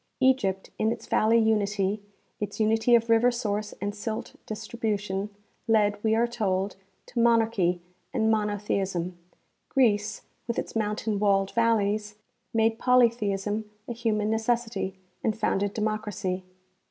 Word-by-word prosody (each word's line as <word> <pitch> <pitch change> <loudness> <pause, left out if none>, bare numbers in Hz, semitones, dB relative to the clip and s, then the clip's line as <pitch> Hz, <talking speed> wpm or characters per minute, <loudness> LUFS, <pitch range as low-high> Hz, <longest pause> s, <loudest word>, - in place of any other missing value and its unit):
Egypt 240 -8 +2
in 220 +1 +2
its - - -5
valley 225 +2 +3
unity, 210 -2 +1 0.4
its 205 0 -4
unity 225 +2 +4
of 230 0 +2
river 230 +2 +5
source 215 -3 -2
and 205 +1 -2
silt 215 +1 -5
distribution, 210 -3 -3 0.4
led, 205 -2 +2
we 220 0 +3
are 230 +1 +3
told, 200 -5 -1 0.3
to 240 - -4
monarchy 225 -6 +3 0.3
and 220 -3 +2
monotheism. 200 -4 -1 0.5
Greece, 210 -6 +2 0.2
with 235 - -2
its - - -4
mountain 210 -1 -1
walled 195 -1 +2
valleys, 215 -2 +1 0.4
made 225 0 +2
polytheism 215 -4 +2 0.2
a 240 - -3
human 220 -2 0
necessity, 225 -3 -1 0.3
and 220 -1 0
founded 200 -2 0
democracy. 210 -3 -2
215 Hz, 125 wpm, -27 LUFS, 205-230 Hz, 0.5 s, river